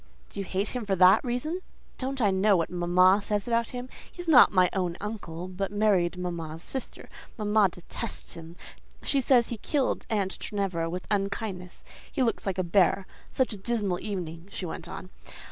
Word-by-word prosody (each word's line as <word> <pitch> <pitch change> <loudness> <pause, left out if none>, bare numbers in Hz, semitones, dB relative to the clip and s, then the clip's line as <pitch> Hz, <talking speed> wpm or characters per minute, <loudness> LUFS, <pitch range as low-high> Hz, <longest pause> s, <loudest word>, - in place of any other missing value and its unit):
"Do - - -7
you 195 - -2
hate 195 +3 -1
him 250 -2 -3
for 200 -2 0
that 185 +1 +6
reason?" 255 +8 -2 0.4
"Don't 265 -1 -2
I 205 - +4
know 190 +1 +4
what 165 - -1
mamma 180 +3 +4
says 205 +1 -2
about 230 -1 +1
him? 250 0 -6 0.2
He - - -21
is 350 - -6
not 290 -6 +8
my 185 -2 +5
own 180 -3 -1
uncle, 185 -5 -5
but 190 +2 -4
married 200 -4 +2
mamma's 170 -2 -5
sister. 265 - -5 0.3
Mamma 210 -2 +3
detests 175 0 -7
him; 165 0 -10 0.5
she 275 - +2
says 245 -2 +4
he 235 - -4
killed 280 +2 -1
aunt 200 -4 -1
Ginevra 185 -5 -2
with 180 +2 -5
unkindness: 195 -2 -3 0.3
he 265 - +1
looks 230 -3 -1
like 190 -1 -1
a 185 - +1
bear. 185 +2 +3 0.2
Such 260 -3 0
a - - -5
dismal 200 -3 -1
evening!" 175 -4 -5
she 195 - -5
went 170 0 -6
on. 185 0 -8
195 Hz, 185 wpm, -28 LUFS, 180-225 Hz, 0.5 s, not